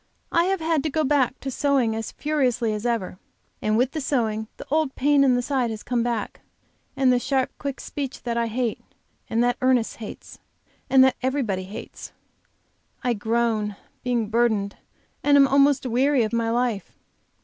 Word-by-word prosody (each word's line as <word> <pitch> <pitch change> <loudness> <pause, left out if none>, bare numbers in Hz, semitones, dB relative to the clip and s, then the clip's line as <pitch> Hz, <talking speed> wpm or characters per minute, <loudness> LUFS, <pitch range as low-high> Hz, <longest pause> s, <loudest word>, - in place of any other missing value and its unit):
I 335 +1 +3
have 380 -1 0
had 320 -2 +1
to 310 - -2
go 310 +2 0
back 265 -3 +1
to 270 - -4
sewing 265 -5 +1
as 225 0 -4
furiously 250 -7 0
as 210 +3 -2
ever. 205 -6 -2 0.4
And 215 0 +1
with 250 +2 +2
the 310 - -3
sewing 220 -6 -1
the - - -9
old 310 -3 +1
pain 285 +1 +4
in 260 -2 +4
the 245 - 0
side 255 -3 0
has 220 -1 -6
come 245 -1 0
back, 235 -3 -3 0.6
and 260 -2 +4
the 245 - +3
sharp, 265 0 0
quick 280 -1 -4
speech 275 -2 -6
that 235 -1 -2
I 235 0 0
hate, 235 0 -2 0.5
and, 230 +1 +2
that 245 0 +1
Ernest 255 -3 +2
hates, 220 -2 -9 0.5
and 265 0 +7
that 265 - +3
everybody 250 -8 -1
hates. 200 +3 -9 0.9
I 245 - +2
groan, 220 -1 0 0.3
being 240 -4 0
burdened, 220 -3 +1 0.5
and 290 0 +4
am 275 -1 +7
almost 275 0 +3
weary 255 +2 +2
of 215 - -3
my 230 -1 +1
life. 235 -3 -1
245 Hz, 180 wpm, -24 LUFS, 225-275 Hz, 0.9 s, and